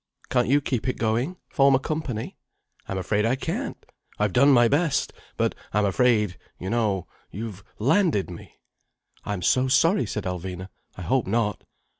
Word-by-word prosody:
"Can't 125 -2 +2
you 140 +3 +4
keep 130 -3 -2
it 130 - -1
going?—form 135 +4 +1
a - - +3
company?" 140 -7 -4 0.5
"I'm 95 - -3
afraid 105 +3 0
I 115 +3 +2
can't. 135 - -4 0.3
I've 105 -2 0
done 140 +3 +5
my 120 -3 +6
best. 150 +4 +1 0.2
But - - +1 0.2
I'm 105 0 +3
afraid, 105 -3 +2 0.2
you 95 +2 -4
know, 105 -6 0 0.2
you've 105 -1 -7
landed 140 - +2
me." 85 - -11 0.7
"I'm 100 -3 -3
so 130 +8 +3
sorry," 165 +9 +3
said 105 - -3
Alvina. 90 +1 -5 0.3
"I 90 - -6
hope 125 +7 +1
not." 105 -1 0
115 Hz, 155 wpm, -25 LUFS, 100-135 Hz, 0.7 s, my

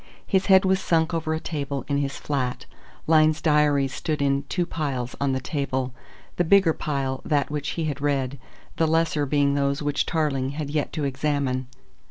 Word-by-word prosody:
His 190 -1 +1
head 190 -1 +6
was 190 0 +3
sunk 165 -3 +1
over 160 -1 -1
a - - -2
table 140 -4 -4
in 140 -1 0
his 140 -1 -2
flat. 130 -4 -2 0.4
Lyne's 155 -1 +4
diaries 150 -4 +2
stood 155 +3 -2
in 140 0 +1
two 180 -1 0
piles 135 -7 -3
on 140 -1 +1
the 130 - 0
table, 130 -2 -2 0.4
the 175 - +3
bigger 185 -1 +5
pile 135 -4 -2
that 145 -2 0
which 150 -1 -2
he 165 - 0
had 145 -2 -3
read, 140 -2 -1 0.4
the 160 - +3
lesser 155 -2 +1
being 140 0 +2
those 140 +1 0
which 145 0 0
Tarling 140 -5 0
had 145 -1 -4
yet 150 -1 -1
to 155 - -2
examine. 135 -2 -1
145 Hz, 185 wpm, -24 LUFS, 140-155 Hz, 0.4 s, head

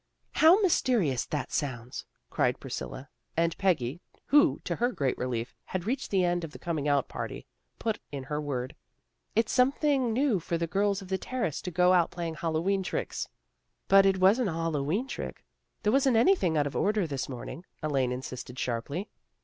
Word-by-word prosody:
" - - -45
How 330 +6 +8
mysterious 225 - +2
that 145 -5 -3
sounds," 125 -4 -3 0.3
cried - - +1
Pris - - -5
cilla, 130 - -7 0.3
and 165 0 +2
Peggy, 170 -5 +1 0.3
who, 290 0 +5
to - - -2
her 245 +2 +1
great 135 - 0
relief, 120 -1 -3
had 185 -1 -4
reached 260 +5 -2
the 190 -2 +2
end 175 0 0
of 165 - -5
the - - -8
coming 160 -4 -2
out 140 -2 +2
party, - - -6 0.3
put 220 -2 -2
in 140 -2 -5
her 150 +3 -3
word. 130 -4 -3 0.3
" - - -46
It's 225 0 +2
something 265 -1 +3
new 245 -3 +2
for 170 +1 -2
the 170 - -1
girls 200 +3 0
of - - -11
the 190 0 0
Terrace 240 - -2
to - - -4
go 180 +1 +4
out 175 -2 +4
playing 170 -2 -4
Hallowe'en 170 +5 0
tricks." 185 - -3 0.3
" - - -50
But 195 0 +7
it 190 -1 +3
wasn't 200 +5 +4
a - - -3
Hallowe'en 165 - -1
trick. - - -6 0.4
There 210 - +2
wasn't 270 -3 +4
anything 225 - +4
out 145 - +3
of 145 - -4
order 210 -2 +2
this 140 -4 -3
morning," 130 +6 -7 0.2
Elaine 135 -4 +1
insisted 125 0 -6
sharply. 135 - -3
170 Hz, 190 wpm, -29 LUFS, 140-210 Hz, 0.4 s, How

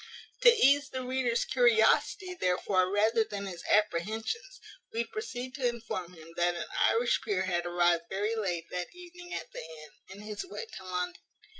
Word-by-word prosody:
To - - +9
ease 285 - +5
the 260 0 -4
reader's 250 -2 0
curiosity, 245 - +3
therefore, 185 - +1
rather 220 +3 +3
than 200 -2 -6
his 175 -3 -7
apprehensions, 220 - 0 0.3
we 230 +1 0
proceed 255 - -6
to 265 -2 0
inform 220 -7 -4
him 165 0 -13
that 175 0 +2
an 170 - -4 0.2
Irish 235 +1 +2
peer 200 -4 0
had 175 -2 -1
arrived 175 -1 +2
very 205 +4 -1
late 180 -6 -2
that 180 - -4
evening 355 0 -12
at - - -6
the - - -6
inn, 155 -1 -11 0.2
in 195 +2 -10
his 210 - -5
way 395 +5 -7
to 320 - -10
London. 180 -1 -3
215 Hz, 170 wpm, -30 LUFS, 180-255 Hz, 0.3 s, To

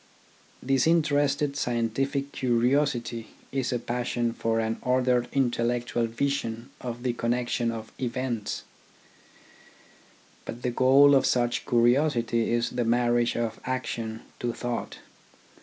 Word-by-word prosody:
Disinterested 145 0 +2
scientific 135 +3 -1
curiosity 120 -2 0 0.2
is 130 -2 -1
a 125 - +1
passion 120 0 -2
for 115 -1 0
an 110 0 -1
ordered 125 -1 +2
intellectual 120 -2 0
vision 115 -1 -2
of 120 -1 -5
the 125 -2 0
connec 120 +1 -1
tion 120 -1 0
of 110 -1 -6
events. 125 -3 -3 1.8
But 120 +2 -8
the 125 - 0
goal 135 +3 +6
of 135 - +4
such 120 -1 0
curiosity 120 -1 +2
is 120 0 +1
the 125 -1 -1
marriage 120 0 +2
of 115 -1 -2
action 115 -3 -3 0.2
to 120 -1 -2
thought. 120 0 -4
120 Hz, 115 wpm, -27 LUFS, 115-130 Hz, 1.8 s, goal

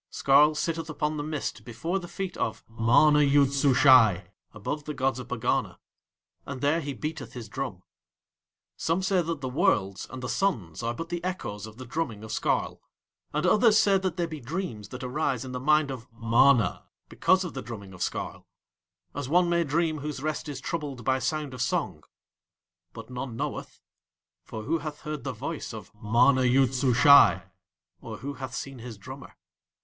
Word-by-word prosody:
Skarl 150 +3 +4
sitteth 165 0 -2
upon 155 0 -2
the 145 - -3
mist 155 -1 -4
before 165 +11 -3
the 175 - -9
feet 190 0 -5
of - - -2
MANA 120 +7 +4
YOOD 140 -1 +4
SUSHAI, 130 -9 +5 0.2
above 145 +8 -5
the 150 - -5
gods 130 -1 0
of 125 - -8
Pegana, 125 -2 -1 0.7
and 130 -2 -7
there 150 +4 +2
he 145 -1 -4
beateth 155 +4 -5
his 120 -3 -7
drum. 115 -6 -5 0.9
Some 165 +4 -1
say 190 -1 +2
that 165 -3 -4
the 130 - -3
Worlds 125 - +1
and 130 0 -8
the - - -2
Suns 115 - -1
are 115 0 -2
but 165 +4 -6
the 175 0 -4
echoes 110 - -4
of 110 0 -13
the 130 - -8
drumming 120 -5 -3
of 110 - -8
Skarl, - - -1 0.5
and - - -1
others 215 0 +5
say 200 -3 +4
that 190 0 -3
they 175 - +1
be 160 -2 -7
dreams 135 - -5
that 125 +2 -8
arise 130 -1 -1
in 130 - -7
the 125 - -4
mind 150 +1 +3
of 125 -2 -9
MANA 115 +1 +3 0.2
because 190 0 +2
of 175 - -6
the 135 - -5
drumming 100 -6 -9
of 90 - -12
Skarl, - - -4 0.7
as 145 -2 -5
one 175 +2 +4
may 170 0 +3
dream 160 +1 0
whose 150 -1 -5
rest 155 0 -3
is 140 -3 -5
troubled 140 -5 -5
by 130 0 +2
sound 145 +1 -2
of 125 - -6
song, - - -1 0.9
but 115 +2 -10
none 125 -1 -5
knoweth, - - -5 0.6
for 110 - -7
who 165 +9 0
hath 150 -1 -7
heard 150 -4 -5
the 135 - -3
voice 130 +1 -5
of 105 -5 -10
MANA 120 +5 +3
YOOD 130 +1 +3
SUSHAI, 130 +2 +6 0.6
or - - -7
who 140 +1 -5
hath 130 -2 -7
seen 135 -2 -6
his 115 -2 -8
drummer? 130 +7 -11
135 Hz, 185 wpm, -27 LUFS, 120-155 Hz, 0.9 s, SUSHAI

